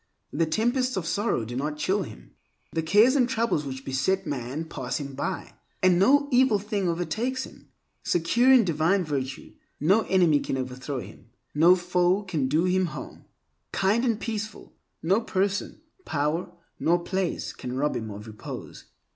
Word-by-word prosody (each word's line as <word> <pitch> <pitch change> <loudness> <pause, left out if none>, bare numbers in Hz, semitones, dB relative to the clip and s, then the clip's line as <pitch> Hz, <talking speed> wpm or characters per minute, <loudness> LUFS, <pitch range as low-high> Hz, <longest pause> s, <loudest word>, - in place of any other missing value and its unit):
The 165 +2 +1
tempests 240 - +1
of 180 - -2
sorrow 175 - 0
do 120 +2 -6
not 150 +3 -2
chill 190 +6 +1
him. 110 - -9 0.4
The 165 - -1
cares 210 - +5
and 255 -3 +3
troubles 230 - 0
which 130 0 -6
beset 190 +9 0
man 135 +4 -4
pass 130 -4 -4
him 140 -1 -6
by, 180 +8 -4 0.3
and 180 -1 +5
no 285 +9 +5
evil 250 -3 +4
thing 200 -2 -2
overtakes 220 +11 -1
him. - - -13 0.3
Secure 230 +10 +3
in 255 -3 +7
divine 170 +2 +2
virtue, 135 -3 -4 0.3
no 190 +9 +4
enemy 175 -6 +4
can 135 - -3
overthrow 130 +1 -4
him; 105 +3 -13 0.2
no 170 +5 +6
foe 180 +2 +1
can 160 -9 -1
do 180 +6 +2
harm. 165 - -8 0.5
Kind 205 +5 +2
and 230 -4 +1
peaceful, 215 -2 -5 0.3
no 190 +7 +3
person, 200 -1 -1 0.2
power, 155 - -1 0.3
nor 170 +1 +3
place 190 -1 -2
can 125 +1 -6
rob 150 +2 0
him 110 -2 -4
of 105 +1 -8
repose. 110 -1 -9
175 Hz, 160 wpm, -26 LUFS, 145-205 Hz, 0.5 s, in